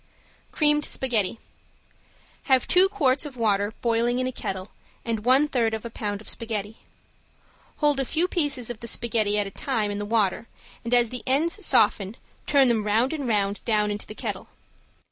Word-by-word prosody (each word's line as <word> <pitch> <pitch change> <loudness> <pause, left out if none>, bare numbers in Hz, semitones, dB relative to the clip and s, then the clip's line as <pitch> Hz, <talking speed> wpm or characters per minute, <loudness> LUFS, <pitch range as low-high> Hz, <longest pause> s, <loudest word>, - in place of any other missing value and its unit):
~CREAMED 295 -1 +2
SPAGHETTI~ 230 -9 0 1.1
Have 260 -2 +3
two 370 +2 +5
quarts 280 -9 +1
of 285 -4 -8
water 205 -2 +1
boiling 235 +1 +1
in 255 - 0
a 255 - -1
kettle 190 -5 -5 0.3
and 225 -2 -2
one 265 +4 +5
third 230 -5 0
of 220 - -8
a 235 - -6
pound 205 -2 -4
of - - -16
spaghetti. 220 -2 -4 1.0
Hold 295 -2 +2
a - - +2
few 330 +7 0
pieces 290 -9 -1
of 230 - -8
the 235 - -7
spaghetti 215 -3 0
at 205 - +1
a 195 - -6
time 220 -3 -1
in 205 - -4
the - - -3
water 210 0 0 0.4
and 235 - -5
as 240 -2 +4
the 250 - -3
ends 325 +10 0
soften 200 +2 +2 0.3
turn 275 -2 +5
them 230 -3 +1
round 225 +7 +1
and 285 -5 -3
round 205 -2 +1
and - - -19
down 210 -2 +1
into 205 0 -4
the 215 - -9
kettle. - - -5
235 Hz, 185 wpm, -25 LUFS, 210-265 Hz, 1.1 s, two